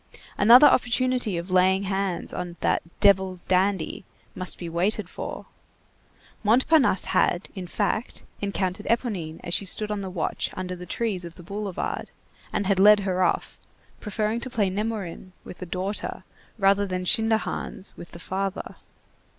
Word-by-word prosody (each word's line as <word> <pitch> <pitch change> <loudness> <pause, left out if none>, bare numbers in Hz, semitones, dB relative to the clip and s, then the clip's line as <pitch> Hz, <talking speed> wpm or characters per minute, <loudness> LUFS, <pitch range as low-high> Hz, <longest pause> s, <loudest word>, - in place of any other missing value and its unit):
Another 240 +7 +8
opportunity 250 -5 +2
of 170 +2 -5
laying 190 +1 +4
hands 195 -2 -2
on 175 -1 -5
that - - +2 0.2
"devil's 190 -3 +3
dandy" 190 -1 +1 0.3
must 185 0 -3
be 175 - -6
waited 180 +4 0
for. - - -7 1.0
Montparnasse 245 - +3
had, 175 +2 +1
in 185 -3 -6
fact, 210 +5 -2 0.2
encountered 200 0 -2
Éponine 195 -10 -1
as 175 - -4
she - - +2
stood 210 +2 0
on 210 -1 -2
the 190 - -5
watch 175 -3 -2
under 180 -1 -4
the 180 0 -10
trees 205 -3 -2
of 170 -1 -9
the 175 - -12
boulevard, 200 +1 -4 0.4
and 205 -2 -1
had 190 -1 +2
led 210 +1 +7
her 185 -1 -1
off, 180 - 0 0.4
preferring 215 +2 -1
to 255 - -4
play 210 -6 0
Nemorin 195 -3 -4
with - - -10
the 180 - -6
daughter 190 +4 -3 0.3
rather 200 0 +3
than 185 -1 -3
Schinderhannes 220 -2 -1
with 175 - -10
the - - -11
father. 190 +3 -4
195 Hz, 150 wpm, -25 LUFS, 180-210 Hz, 1.0 s, Another